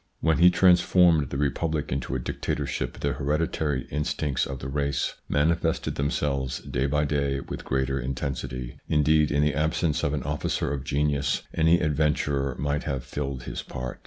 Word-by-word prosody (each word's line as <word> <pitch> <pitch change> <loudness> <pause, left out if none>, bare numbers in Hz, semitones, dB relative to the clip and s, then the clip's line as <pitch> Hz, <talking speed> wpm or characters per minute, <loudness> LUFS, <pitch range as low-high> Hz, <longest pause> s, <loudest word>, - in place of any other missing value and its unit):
When 80 -1 +2
he 90 +1 +8
transformed 90 -4 +4
the 70 - -3
republic 75 +2 -1
into 65 0 -2
a - - 0
dictatorship, 60 0 -3
the - - 0
hereditary 75 0 -1
instincts 75 -2 -1
of 70 - -5
the 65 - -6
race 70 -1 -1 0.2
manifested 80 +2 +1
themselves 70 -2 -1
day 65 +3 -2
by 75 +1 +1
day 70 -1 0
with - - -7
greater 65 +1 0
intensity; 65 -1 -4
indeed, 75 0 +3
in 75 0 +2
the 75 -1 +2
absence 75 +2 0
of 75 -1 +1
an 70 - -3
officer 75 0 -1
of 70 -2 -3
genius, 70 0 0
any 80 +2 +4
adventurer 75 -3 +1
might 75 +1 -1
have 70 -4 -2
filled 70 -1 -4
his - - -5
part. 65 0 -6
70 Hz, 160 wpm, -26 LUFS, 65-75 Hz, 0.2 s, he